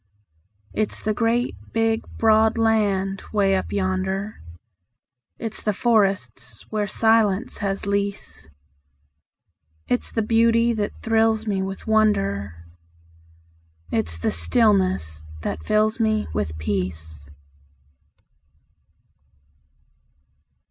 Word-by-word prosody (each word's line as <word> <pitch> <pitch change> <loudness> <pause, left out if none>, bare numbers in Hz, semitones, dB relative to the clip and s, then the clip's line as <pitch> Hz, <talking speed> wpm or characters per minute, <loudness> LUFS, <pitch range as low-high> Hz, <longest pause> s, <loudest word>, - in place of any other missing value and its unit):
It's 215 -1 -1
the 215 - -1
great, 235 +3 0 0.2
big, 225 0 +1 0.2
broad 220 0 +4
land 200 -4 +1
'way 195 -2 +2
up 190 - -2
yonder, 190 +1 -2 1.0
It's 225 -2 -4
the 210 - 0
forests 205 -3 0
where 210 -1 -1
silence 220 -1 +2
has 195 -2 -2
lease; 200 - -3 1.4
It's 125 - 0
the 225 - 0
beauty 230 +1 +3
that 210 -2 -3
thrills 225 0 +2
me 200 -3 -1
with 190 0 -5
wonder, 100 - +1 1.3
It's 85 -7 0
the 85 - -1
stillness 85 - +1 0.2
that 80 - -4
fills 215 - +2
me 215 -1 +1
with 80 0 -2
peace. 80 -4 -4
205 Hz, 95 wpm, -23 LUFS, 185-220 Hz, 1.4 s, broad